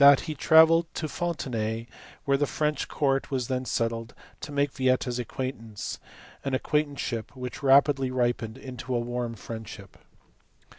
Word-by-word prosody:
he 155 - -3
travelled 160 +3 +6
to 155 - -2
Fontenay, 120 -9 -2 0.4
where 140 - +3
the 145 +1 +1
French 150 0 -1
court 135 -2 0
was 130 -4 -2
then 130 0 -1
settled, 115 -1 -2 0.2
to 145 - -7
make 145 0 +1
Yieta 130 0 +2
s 125 0 -2
acquaintance 115 -3 -5 0.4
an 135 -1 0
acquaintanceship 140 -5 -1
which 125 -1 -6
rapidly 135 -1 +5
ripened 120 -2 -1
into 130 -1 -6
warm 120 0 -2
friendship. 110 -2 -9
130 Hz, 135 wpm, -27 LUFS, 115-145 Hz, 0.4 s, travelled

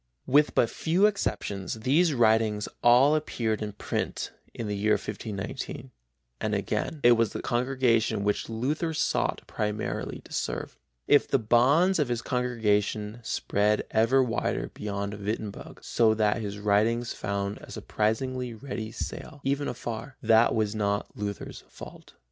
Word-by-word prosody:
With 145 +3 +3
but 115 - +4
few 175 - +1
exceptions 100 - -1
these 155 +8 +3
writings 110 -3 +3
all 125 +5 +6
appeared 115 -8 -1
in 105 -1 -4
print - - -3 0.2
in 115 - -6
the 105 - -2
year 105 +2 +2
1519, 110 +5 -5 0.5
and - - -1
again 155 - -2
it 120 - +7
was 115 -2 +3
the - - -4
congregation 120 -4 +1
which 105 +2 -1
Luther 150 +8 -1
sought - - 0
primarily 105 0 -3
to - - -14
serve. - - -3 0.3
If 145 - +5
the - - +3
bounds 135 - +4
of 150 - +2
his 120 -1 -2
congregation 110 -3 0
spread 105 -2 0
ever 115 +4 +4
wider 120 -2 -2
beyond 100 -1 -4
Wittenberg, 105 0 -5
so 110 -2 +3
that 105 0 +1
his 100 -1 -4
writings 110 +3 +1
found 100 0 -3
a - - -13
surprisingly 125 +3 -2
ready 110 -2 -6
sale, 150 +5 -6
even 140 +1 0
afar, 120 +2 -5
that 115 +1 +5
was 110 -2 0
not 100 -2 -1
Luther's 100 -1 -5
fault. - - -12
115 Hz, 145 wpm, -27 LUFS, 105-130 Hz, 0.5 s, it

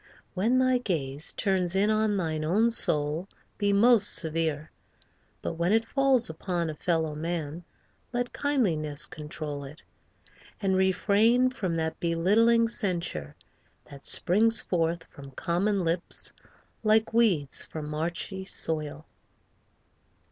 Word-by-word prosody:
When 225 +7 +1
thy 255 -1 +2
gaze 150 - -2
Turns 190 -3 0
in 205 +3 +2
on 215 -1 +1
thine 160 -4 -2
own 210 +9 +2
soul, 155 -4 +2 0.3
be 205 -1 +1
most 210 +1 +5
severe. 160 -2 -1 0.7
But - - -3
when 170 +2 +1
it 225 +1 +2
falls 270 -3 +3
upon 170 0 -3
a - - -7
fellow 160 0 -1
man 165 +1 -5 0.5
Let 245 0 -3
kindliness 160 - -1
control 150 -1 -7
it; 140 +3 -12 0.8
and 195 -2 0
refrain 205 +7 +2
From 185 -9 -3
that 160 0 -3
belittling 210 +8 +2
censure 175 - -1 0.6
that 140 -1 -12
springs 225 +5 +3
forth 165 -1 -1
From 140 -4 -13
common 185 +6 -1
lips 170 +1 +3 0.5
like 220 0 +2
weeds 190 - +2
from 155 -2 -7
marshy 170 +5 -4
soil. 155 -4 0
175 Hz, 120 wpm, -27 LUFS, 155-215 Hz, 0.8 s, most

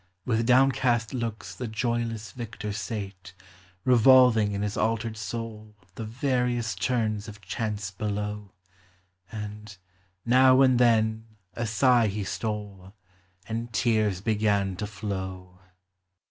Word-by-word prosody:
With 115 -1 0
downcast 125 -2 +3
looks 115 -3 -4
the 125 - -5
joyless 115 -1 -2
victor 110 -2 -6
sate, 100 -2 -6 0.5
Revolving 125 -4 +6
in 100 - -2
bis 105 -1 -2
altered 115 0 -1
soul 110 0 -6 0.2
The 115 - -6
various 120 -1 -1
turns 110 +1 -1
of 105 -1 -10
chance 100 +1 -4
below; 105 0 -4 0.8
And, 105 -1 -7 0.5
now 130 +2 +6
and 130 -2 +5
then, 110 -2 +2 0.3
a 120 -1 -3
sigh 120 +1 +4
he 105 +1 -3
stole; 100 -2 -5 0.5
And 115 +1 -4
tears 110 -5 +1
began 105 -3 +1
to 105 - -3
flow. 95 -3 -6
110 Hz, 115 wpm, -27 LUFS, 105-120 Hz, 0.8 s, Revolving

